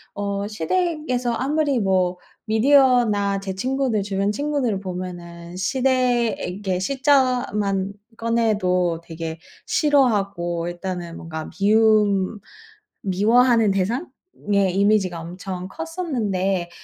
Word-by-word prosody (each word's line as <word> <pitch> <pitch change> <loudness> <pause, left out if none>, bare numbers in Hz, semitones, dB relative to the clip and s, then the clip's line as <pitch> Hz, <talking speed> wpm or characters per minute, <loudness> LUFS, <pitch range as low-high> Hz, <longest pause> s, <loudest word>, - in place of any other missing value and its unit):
어, 200 0 -2
시댁에서 250 - -1
아무리 285 +1 0
뭐 185 -3 +1 0.3
미디어나 220 -4 +3
제 190 -1 -5
친구들 255 -1 0
주변 200 0 -1
친구들 280 -7 -1
보면은 175 -2 -7
시댁에 235 -5 0
시자만 245 -6 +1 0.2
꺼내도 205 -7 +1
되게 165 0 -6 0.3
싫어하고 200 - +1
일단은 175 -1 -5
뭔가 160 -1 -6
미움, 210 -1 +3 0.6
미워하는 225 +3 +3
대상? 210 - -1 0.4
의 195 -3 +2
이미지가 195 -4 +2
엄청 180 +2 -6
컸었는데 215 - -2
205 Hz, 230 characters per minute, -22 LUFS, 185-245 Hz, 0.6 s, 미디어나